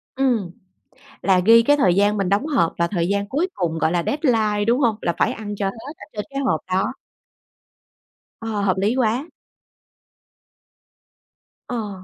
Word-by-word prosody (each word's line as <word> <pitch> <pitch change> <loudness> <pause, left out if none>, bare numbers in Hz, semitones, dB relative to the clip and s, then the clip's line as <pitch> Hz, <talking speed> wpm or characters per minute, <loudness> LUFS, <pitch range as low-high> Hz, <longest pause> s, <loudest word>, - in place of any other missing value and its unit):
Ừm. 245 -9 0 0.7
Là 190 -2 +3
ghi 230 +1 +7
cái 290 +4 +4
thời 185 -11 +3
gian 205 +2 +2
mình 195 -2 -1
đóng 200 +8 +1
hộp 220 - +1
và 170 0 +1
thời 170 -3 -1
gian 200 +1 -1
cuối 315 +7 0
cùng 165 -3 -2
gọi 160 - +1
là 175 -1 0
deadline, 220 -8 +1
đúng 235 +3 +2
hông? 235 -6 +2
Là 170 - 0
phải - - +1
ăn 205 -1 -6
cho 200 - -2
hết 230 +9 -7
ở - - -12
trên 210 -2 -4
cái 275 0 -4
hộp 260 - +1
đó. 185 +7 0 1.5
Ờ, 225 -2 -3
hợp 190 -2 +1
lý 205 +5 +1
quá. 255 +5 0 2.4
Ờ. 210 -6 -5
210 Hz, 170 wpm, -21 LUFS, 190-245 Hz, 2.4 s, ghi